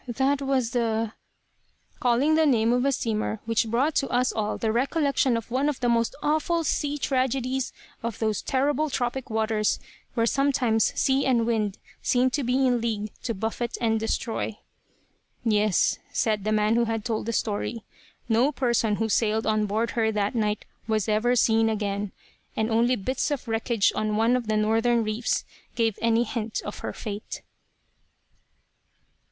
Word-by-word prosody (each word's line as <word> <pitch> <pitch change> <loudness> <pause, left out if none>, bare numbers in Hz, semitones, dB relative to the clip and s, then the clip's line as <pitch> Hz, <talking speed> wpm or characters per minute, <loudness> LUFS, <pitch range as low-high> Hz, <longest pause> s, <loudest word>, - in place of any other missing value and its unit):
That 270 +3 +1
was 265 -4 0
the 225 -2 0 0.4
," - - -39
calling 250 +5 +3
the 315 0 +4
name 230 -3 +3
of 250 +1 +1
a 275 - +3
steamer 220 -3 -1
which 230 0 +1
brought 255 +8 +1
to 275 - 0
us 250 +1 +2
all 215 -1 -2
the 220 - 0
recollection 275 0 +1
of 230 +1 -7
one 270 +4 +1
of 290 - -3
the 245 - +1
most 230 -1 +1
awful 315 +3 +1
sea 295 -1 -1
tragedies 260 -1 0 0.3
of 230 -2 -4
those 215 -2 -1
terrible 290 +3 0
tropic 255 0 -2
waters, 220 -1 +1 0.4
where 230 -2 +2
sometimes 250 -4 +2
sea 270 +1 +2
and 235 -3 +3
wind 215 -4 0 0.2
seem 255 +1 +2
to 285 +1 -1
be 255 +2 +2
in 245 -2 +2
league 215 -2 -2
to 230 - -3
buffet 225 +4 -3
and 225 -2 +1
destroy. 225 -1 -2 0.9
"Yes," 210 -3 +2
said 215 -3 0
the 215 - +1
man 215 +1 +2
who 235 - +3
had 225 -2 -3
told 220 -2 -2
the - - 0
story. 220 +1 -2 0.4
"No 240 +5 +3
person 235 -6 +1
who 225 +1 -1
sailed 220 0 +1
on 215 -1 +1
board 220 +3 0
of - - -12
her 220 -1 +2
that 205 0 0
night 210 -3 -1 0.2
was 215 -2 0
ever 220 +3 +2
seen 225 -1 +3
again; 205 -2 -2 0.4
and 220 +1 0
only 235 +3 +3
bits 255 +7 -1
of 285 -4 -3
wreckage 225 -1 +1
on 215 -1 0
one 230 +3 +3
of 245 -3 -2
the 215 0 +1
northern 225 +2 +2
reefs 215 +2 -1 0.3
gave 225 -3 0
any 230 +1 +3
hint 230 -2 -3
of 205 - -6
her - - -4
fate." 210 -1 -6
230 Hz, 170 wpm, -26 LUFS, 220-255 Hz, 0.9 s, the